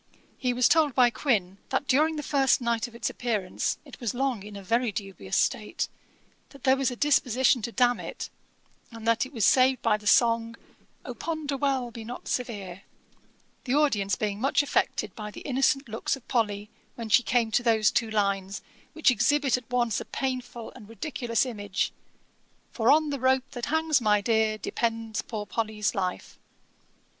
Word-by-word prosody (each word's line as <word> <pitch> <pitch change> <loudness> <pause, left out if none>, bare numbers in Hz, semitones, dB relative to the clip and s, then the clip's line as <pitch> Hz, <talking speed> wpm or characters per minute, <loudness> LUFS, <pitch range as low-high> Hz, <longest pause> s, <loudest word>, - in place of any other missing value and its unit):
He 250 -2 +1
was 245 0 +3
told 310 -5 +3
by 245 -2 +5
Quin, 200 -9 0
that 265 +1 -1
during 310 +4 +3
the 300 - -4
first 270 -1 +3
night 235 -1 -1
of 235 - -15
its 235 - -2
appearance 215 -7 -2
it - - -12
was 240 -3 -3
long 260 -4 -1
in 205 +1 -10
a 200 - -8
very 230 +4 +1
dubious 195 -1 -4
state; - - 0 0.6
that 275 -3 -16
there 265 -1 +5
was 270 -1 +1
a 245 - -5
disposition 260 -3 +3
to 235 - -4
damn 245 0 +2
it, - - -7 0.6
and 230 -1 -8
that 230 +3 +2
it - - -17
was 225 -7 +1
saved 260 -1 +4
by 215 -2 +3
the 210 -1 -9
song, 230 0 +3 0.5
'Oh - - -5
ponder 310 -4 -3
well! 265 -3 0
be 230 -1 -8
not 240 +3 -8
severe!' 200 -7 -4 0.8
the 255 +1 0
audience 210 -10 +2
being 210 -1 -3
much 275 +2 +2
affected 215 -7 -1
by 210 -1 -6
the - - -10
innocent 275 0 +1
looks 225 +4 -2
of 270 - -16
Polly, 210 -3 -1 0.2
when 230 -2 -6
she 230 - +6
came 235 -2 +1
to 245 - +2
those 225 -3 +3
two 230 -2 0
lines, 200 -2 -1 0.3
which 320 -4 +4
exhibit 270 +4 +2
at 250 -2 -7
once 240 -4 0
a - - -7
painful 250 -3 -4
and 220 -5 -13
ridiculous 230 +1 -1
image, 205 -5 -2 0.8
'For 230 0 +3
on 305 0 +3
the 280 - -3
rope 260 +1 +1
that 245 -1 -5
hangs 315 -2 +2
my 210 -2 +3
Dear, 220 0 +1
Depends 225 0 -2
poor 215 -3 -5
Polly's 215 -1 -2
life.' 185 -2 -4
235 Hz, 180 wpm, -27 LUFS, 215-265 Hz, 0.8 s, she